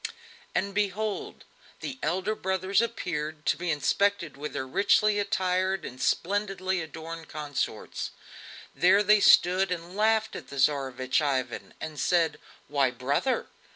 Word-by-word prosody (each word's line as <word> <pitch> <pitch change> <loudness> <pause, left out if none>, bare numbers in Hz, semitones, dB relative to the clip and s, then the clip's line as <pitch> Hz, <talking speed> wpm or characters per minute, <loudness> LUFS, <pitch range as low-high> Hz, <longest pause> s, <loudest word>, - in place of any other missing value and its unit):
'" - - -24
And 200 +1 0
behold! 210 +1 -2 0.4
the 265 -1 -5
elder 190 +6 0
brothers 190 0 +1
appeared, 160 -9 -3
to - - +3
be 175 0 -4
inspected 170 +2 +1
with 150 +2 -6
their 130 -2 -3
richly 205 +6 +3
attired 190 -2 0
and 125 +1 -8
splendidly 190 -1 0
adorned 160 +1 -8
consorts. 150 -2 -3 0.6
There 195 +4 +4
they 210 +1 +5
stood 185 -1 +5
and 175 +1 -4
laughed 220 +1 +2
at - - -8
the 140 - -9
Tsarevich 130 -1 +1
Ivan 130 -4 -2
and 155 -2 -6
said: 170 -3 +2 0.3
"Why, 140 -3 +2
brother! 140 - 0
180 Hz, 135 wpm, -28 LUFS, 150-200 Hz, 0.6 s, they